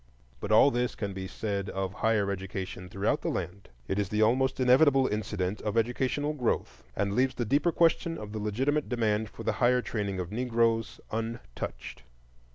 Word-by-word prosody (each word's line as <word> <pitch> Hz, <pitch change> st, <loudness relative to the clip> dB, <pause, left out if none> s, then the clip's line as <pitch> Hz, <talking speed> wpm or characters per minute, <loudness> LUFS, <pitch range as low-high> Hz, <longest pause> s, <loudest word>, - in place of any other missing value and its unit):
But 105 Hz, -, -4 dB
all 115 Hz, +6 st, +7 dB
this 120 Hz, 0 st, -1 dB
can 100 Hz, -3 st, -4 dB
be 95 Hz, 0 st, -5 dB
said 100 Hz, -1 st, -3 dB
of 95 Hz, -1 st, -3 dB
higher 105 Hz, -3 st, +1 dB
education 95 Hz, -1 st, -5 dB
throughout 100 Hz, +2 st, 0 dB
the -, -, -1 dB
land; 100 Hz, -1 st, -5 dB, 0.2 s
it 95 Hz, -, -1 dB
is 100 Hz, -2 st, -1 dB
the 105 Hz, +1 st, +2 dB
almost 130 Hz, +4 st, +2 dB
inevitable 135 Hz, +2 st, +5 dB
incident 105 Hz, -3 st, -2 dB
of 105 Hz, +1 st, -2 dB
educational 130 Hz, +6 st, 0 dB
growth, 125 Hz, -6 st, -2 dB
and 100 Hz, 0 st, 0 dB
leaves 130 Hz, +4 st, +2 dB
the 120 Hz, -, -1 dB
deeper 145 Hz, +9 st, +2 dB
question 165 Hz, 0 st, +2 dB
of 105 Hz, -1 st, -7 dB
the 110 Hz, -, -4 dB
legitimate 130 Hz, +9 st, 0 dB
demand 110 Hz, -3 st, 0 dB
for 105 Hz, -, -9 dB
the -, -, +1 dB
higher 125 Hz, +1 st, +4 dB
training 100 Hz, -4 st, -3 dB
of 90 Hz, 0 st, -4 dB
Negroes 115 Hz, -1 st, 0 dB
untouched. 115 Hz, -, -5 dB
110 Hz, 175 wpm, -29 LUFS, 100-125 Hz, 0.2 s, all